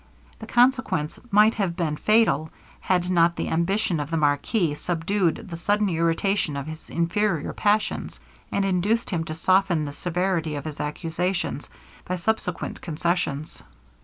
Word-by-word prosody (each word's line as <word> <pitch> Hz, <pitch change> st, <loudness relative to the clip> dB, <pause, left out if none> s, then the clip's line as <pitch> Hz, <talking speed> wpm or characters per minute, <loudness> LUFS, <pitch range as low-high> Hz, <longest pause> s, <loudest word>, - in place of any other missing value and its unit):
The 220 Hz, -, -9 dB
consequence 240 Hz, -, +2 dB
might 210 Hz, +1 st, +5 dB
have 195 Hz, -6 st, -1 dB
been 165 Hz, -4 st, -1 dB
fatal, 215 Hz, -6 st, +3 dB, 0.3 s
had 180 Hz, -1 st, +1 dB
not 170 Hz, -1 st, +4 dB
the -, -, -3 dB
ambition 170 Hz, +1 st, +1 dB
of 145 Hz, 0 st, -3 dB
the 165 Hz, -, 0 dB
marquis 150 Hz, +4 st, +1 dB
subdued 175 Hz, +5 st, -1 dB
the 165 Hz, -, -4 dB
sudden 205 Hz, +4 st, +1 dB
irritation 165 Hz, -1 st, 0 dB
of 140 Hz, -, -4 dB
his 155 Hz, 0 st, -9 dB
inferior 170 Hz, 0 st, 0 dB
passions, 210 Hz, +1 st, 0 dB, 0.3 s
and 200 Hz, -, +1 dB
induced 195 Hz, +5 st, +1 dB
him 170 Hz, -3 st, 0 dB
to 155 Hz, -, -5 dB
soften 185 Hz, -1 st, +2 dB
the 145 Hz, -, -5 dB
severity 175 Hz, -1 st, -1 dB
of 145 Hz, -, -5 dB
his 155 Hz, -1 st, -6 dB
accusations, 165 Hz, +1 st, -2 dB, 0.3 s
by 180 Hz, -, -3 dB
subsequent 180 Hz, -1 st, -2 dB
concessions. 160 Hz, -2 st, -2 dB
175 Hz, 145 wpm, -25 LUFS, 160-200 Hz, 0.3 s, might